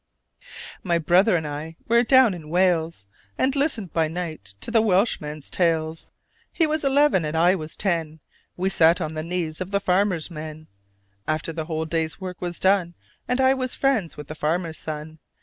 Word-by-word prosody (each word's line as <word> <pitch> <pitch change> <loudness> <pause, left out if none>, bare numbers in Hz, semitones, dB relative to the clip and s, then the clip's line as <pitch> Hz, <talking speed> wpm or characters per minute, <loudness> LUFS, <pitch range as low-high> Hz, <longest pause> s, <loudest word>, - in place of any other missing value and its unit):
_) - - -25 0.4
My 175 -3 +1
brother 180 +6 +4
and 160 -3 -1
I 150 +3 -6
were 235 +1 +5
down 255 -3 +5
in 160 -4 -9
Wales, 170 - +1 0.3
And 270 +2 +1
listened 275 - -1
by 165 -1 +2
night 155 - -6
to - - -5
the 230 -2 +4
Welshman's 180 -8 0
tales; 165 -2 0 0.4
He 330 - +2
was 310 0 0
eleven 280 - +3
and 155 +1 -2
I 175 +3 +5
was 160 -4 -5
ten. 165 -5 -1 0.4
We 190 +2 0
sat 165 -1 +4
on 160 -3 -3
the 155 - -3
knees 165 -1 -3
of 185 - -4
the 200 0 +1
farmer's 185 -3 +1
men 155 0 -8 0.6
After 155 +1 -2
the 160 -1 -4
whole 160 -1 -3
day's 160 -1 -2
work 185 -2 -7
was 175 -1 -4
done: 190 -3 +2 0.3
And 250 +1 0
I 265 0 +5
was 255 -1 -2
friends 255 -11 0
with 150 - -7
the 155 - -7
farmer's 160 +1 -2
son. 155 0 -7
170 Hz, 185 wpm, -24 LUFS, 155-200 Hz, 0.6 s, were